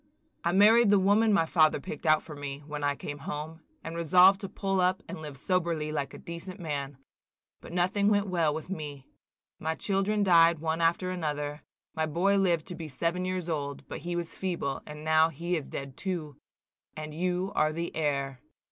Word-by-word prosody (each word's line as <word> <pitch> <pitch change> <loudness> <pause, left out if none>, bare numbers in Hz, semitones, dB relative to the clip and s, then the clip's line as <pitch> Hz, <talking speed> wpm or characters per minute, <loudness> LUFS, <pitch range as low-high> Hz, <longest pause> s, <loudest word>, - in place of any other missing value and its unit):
"I 170 - +2
married 215 +4 +6
the 205 - +6
woman 205 +3 +4
my 195 -5 +4
father 155 -2 +3
picked 150 +3 -6
out 155 0 +4
for 155 - -9
me, 145 0 -6
when 150 -1 -5
I 145 0 +1
came 145 +1 -7
home, 150 +3 -6 0.2
and 165 - -6
resolved 180 +4 +5
to 195 - -5
pull 195 -1 -1
up 185 +1 +1
and - - -7
live 150 -3 -7
soberly 165 -1 -1
like 145 -3 -3
a - - -8
decent 175 +3 -8
man. 145 -5 -4 0.6
But - - -11
nothing 185 +3 +1
went 205 -1 +3
well 170 -5 +1
with 155 +1 -5
me. 150 -7 -6 0.5
My 160 +1 -2
children 200 +2 0
died 170 -3 +6
one 160 +1 -2
after 170 +2 +1
another; 150 -4 -3 0.3
my 160 0 -1
boy 185 +6 +2
lived 175 -4 +2
to 180 - -5
be 165 -1 -6
seven 170 +6 -1
years 185 -2 -2
old, 145 -4 -4
but - - -6
he 175 0 -4
was 170 -1 -3
feeble, 175 -7 -3
and 150 0 -8
now 160 +1 +4
he 170 +3 -2
is 155 -4 -4
dead 135 -1 -6
too, 170 -7 -4 0.6
and 155 0 -6
you 180 +3 -1
are 155 0 +3
the 170 +2 -4
heir. 140 -4 -1
165 Hz, 195 wpm, -29 LUFS, 150-185 Hz, 0.6 s, married